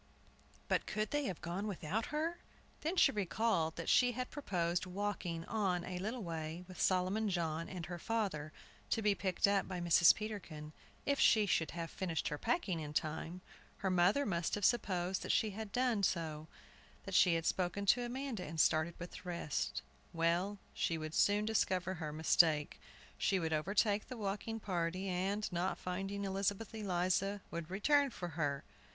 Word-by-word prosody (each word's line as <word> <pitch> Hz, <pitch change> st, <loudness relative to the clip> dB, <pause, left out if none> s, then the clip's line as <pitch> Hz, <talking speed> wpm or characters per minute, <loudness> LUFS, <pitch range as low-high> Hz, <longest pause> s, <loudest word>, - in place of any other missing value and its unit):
But -, -, +1 dB
could 215 Hz, 0 st, -2 dB
they 290 Hz, -1 st, 0 dB
have 185 Hz, -8 st, -4 dB
gone 180 Hz, +5 st, -3 dB
without 200 Hz, +2 st, -2 dB
her? 320 Hz, +3 st, -2 dB, 0.4 s
Then 325 Hz, +4 st, -1 dB
she -, -, +6 dB
recalled 195 Hz, -4 st, 0 dB
that 165 Hz, -, -5 dB
she 245 Hz, -1 st, +5 dB
had 255 Hz, +2 st, -4 dB
proposed 180 Hz, -, -1 dB
walking 180 Hz, -3 st, -3 dB
on 190 Hz, -5 st, 0 dB
a 180 Hz, -1 st, -4 dB
little 220 Hz, +5 st, -3 dB
way 165 Hz, 0 st, -5 dB
with 185 Hz, -, -7 dB
Solomon 190 Hz, +4 st, +2 dB
John 165 Hz, -3 st, -1 dB
and 180 Hz, -3 st, -5 dB
her 175 Hz, -1 st, -6 dB
father, 190 Hz, -9 st, -2 dB, 0.4 s
to 225 Hz, -, 0 dB
be 205 Hz, -1 st, +4 dB
picked 185 Hz, 0 st, +1 dB
up 200 Hz, -1 st, +2 dB
by 185 Hz, -2 st, -4 dB
Mrs. 170 Hz, 0 st, +6 dB
Peterkin, 170 Hz, -8 st, -6 dB, 0.3 s
if 280 Hz, -1 st, +1 dB
she 215 Hz, -2 st, +6 dB
should 165 Hz, -5 st, +1 dB
have 165 Hz, -1 st, -4 dB
finished 170 Hz, -4 st, -2 dB
her 150 Hz, -, -4 dB
packing 195 Hz, -, 0 dB
in 150 Hz, -1 st, -5 dB
time. 160 Hz, +3 st, -2 dB, 0.4 s
Her 190 Hz, -, -1 dB
mother 185 Hz, +10 st, +4 dB
must 170 Hz, -5 st, 0 dB
have 205 Hz, -2 st, 0 dB
supposed 185 Hz, -6 st, +1 dB
that -, -, -1 dB
she 215 Hz, -, +2 dB
had 215 Hz, +1 st, -6 dB
done 245 Hz, -3 st, +1 dB
so, 160 Hz, -4 st, -1 dB, 0.6 s
that -, -, -7 dB
she 175 Hz, -3 st, +6 dB
had 165 Hz, 0 st, -1 dB
spoken 185 Hz, +3 st, 0 dB
to 245 Hz, +5 st, +5 dB
Amanda, 245 Hz, -4 st, -4 dB
and 160 Hz, -1 st, -6 dB
started 160 Hz, +2 st, +3 dB
with 175 Hz, -, -7 dB
the -, -, -8 dB
rest. 170 Hz, -5 st, -2 dB, 0.3 s
Well, 170 Hz, +5 st, +1 dB, 0.2 s
she 165 Hz, -, 0 dB
would 155 Hz, 0 st, -5 dB
soon 205 Hz, +4 st, +3 dB
discover 190 Hz, -4 st, +1 dB
her 160 Hz, -4 st, -4 dB
mistake. 155 Hz, -1 st, +3 dB, 0.4 s
She 195 Hz, -, +2 dB
would 160 Hz, -3 st, -1 dB
overtake 200 Hz, +6 st, +1 dB
the 255 Hz, -, -7 dB
walking 210 Hz, +2 st, -3 dB
party, 185 Hz, -1 st, -2 dB
and, 195 Hz, +4 st, 0 dB
not 175 Hz, +2 st, -1 dB
finding 195 Hz, +2 st, -3 dB
Elizabeth 200 Hz, +3 st, -1 dB
Eliza, 195 Hz, -1 st, 0 dB
would 170 Hz, -1 st, -5 dB
return 280 Hz, +9 st, +3 dB
for 180 Hz, -7 st, -5 dB
her. 145 Hz, -3 st, -1 dB
185 Hz, 175 wpm, -35 LUFS, 170-210 Hz, 0.6 s, she